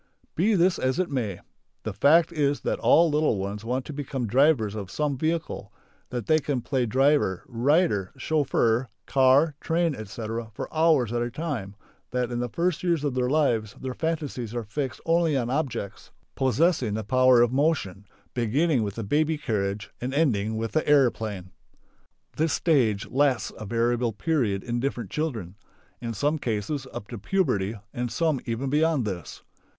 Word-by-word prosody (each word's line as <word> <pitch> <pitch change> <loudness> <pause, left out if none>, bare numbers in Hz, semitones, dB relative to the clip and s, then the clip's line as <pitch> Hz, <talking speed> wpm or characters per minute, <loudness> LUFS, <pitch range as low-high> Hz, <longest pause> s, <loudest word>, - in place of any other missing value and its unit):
Be 205 +6 +2
this 180 0 +3
as 130 0 0
it 185 -4 -1
may. 110 -9 -2 0.4
The 110 - -4
fact 160 - +4
is 145 -2 +1
that - - -1
all 165 0 +5
the - - 0
little 150 -8 +2
ones 100 +2 -4
want 125 +3 -2
to 150 - -7
become 135 -3 -3
drivers 120 -2 +3
of 100 -3 -6
some 150 -2 -1
vehicle, 155 -8 -2 0.4
that 120 -4 -4
they 155 0 +4
can 140 -4 -2
play 130 -1 -1
driver, 130 -6 +2
rider, 125 - +1
chauffeur, 130 -5 +1 0.2
car, 135 +4 +4
train, 165 -1 +1
etc., 110 0 -5
for - - -6
hours 155 -8 +3
at 120 - 0
a 120 - -1
time, 120 -9 -4 0.3
that 125 -1 -1
in 120 - -2
the 120 0 -2
first 170 +4 -1
years 170 -4 0
of 145 -3 0
their 125 -1 0
lives 120 -8 +1
their 130 -1 -4
fantasies 145 -8 -3
are 120 - -2
fixed 130 +5 -4
only 165 -3 +2
on 120 -1 -1
objects 135 -9 -3 0.2
possessing 130 - +1
the 110 - -3
power 130 +2 +5
of 120 - +1
motion, 130 - 0 0.3
beginning 130 +4 +1
with 100 -2 -3
the 115 - -4
baby 155 +8 +1
carriage 105 -5 -2
and 130 +2 -3
ending 110 -8 +1
with 115 0 -3
the 155 - 0
aeroplane. 110 -9 +2 0.9
This 160 0 +1
stage 120 - +2
lasts 135 -1 +1
a 110 - -8
variable 120 +1 +1
period 105 - 0
in 120 0 -2
different 125 -2 -3
children. 115 - -3 0.4
In 115 -1 -4
some 145 +8 0
cases 125 +4 -2
up 100 - -7
to 120 - -6
puberty 110 - 0 0.2
and 120 -1 -3
some 155 +2 +1
even 115 +4 -2
beyond 155 -4 +2
this. 90 -5 -6
130 Hz, 170 wpm, -26 LUFS, 110-150 Hz, 0.9 s, all